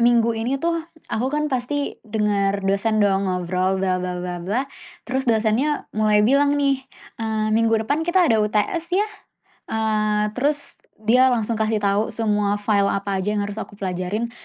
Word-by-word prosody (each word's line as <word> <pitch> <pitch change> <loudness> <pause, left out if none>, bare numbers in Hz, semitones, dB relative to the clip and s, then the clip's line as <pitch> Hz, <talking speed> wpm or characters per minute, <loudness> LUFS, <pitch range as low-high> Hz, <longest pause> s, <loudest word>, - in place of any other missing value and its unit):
Minggu 235 -1 +4
ini 235 +5 -1
tuh 335 +3 -1 0.3
aku 250 +4 0
kan 300 +2 -1
pasti 280 +3 -2
dengar 205 -3 0
dosen 205 +2 +2
dong 195 -1 +1
ngobrol 185 +1 0
bla 185 -1 0
bla 180 0 -3
bla 180 0 -4
bla. 215 +10 -1 0.4
Terus 260 0 -2
dosennya 230 +7 +1
mulai 210 -1 +3
bilang 285 +4 +3
nih, 275 -2 +1 0.4
eee, 215 -1 -1
"Minggu 225 0 +3
depan 285 +6 0
kita 345 +2 +3
ada 225 -8 +3
UTS 210 - 0
ya." 415 - +3 0.6
Eee, 215 -1 0
terus 285 +4 -2 0.2
dia 250 +4 +5
langsung 230 -2 0
kasih 215 -1 0
tahu 200 +2 +2
semua 210 -2 0
file 205 -1 +1
apa 195 -1 -1
aja 210 +3 -1
yang 205 - 0
harus 205 +2 -5
aku 210 - -8
pelajarin 195 +4 -3
215 Hz, 165 wpm, -22 LUFS, 200-250 Hz, 0.6 s, dia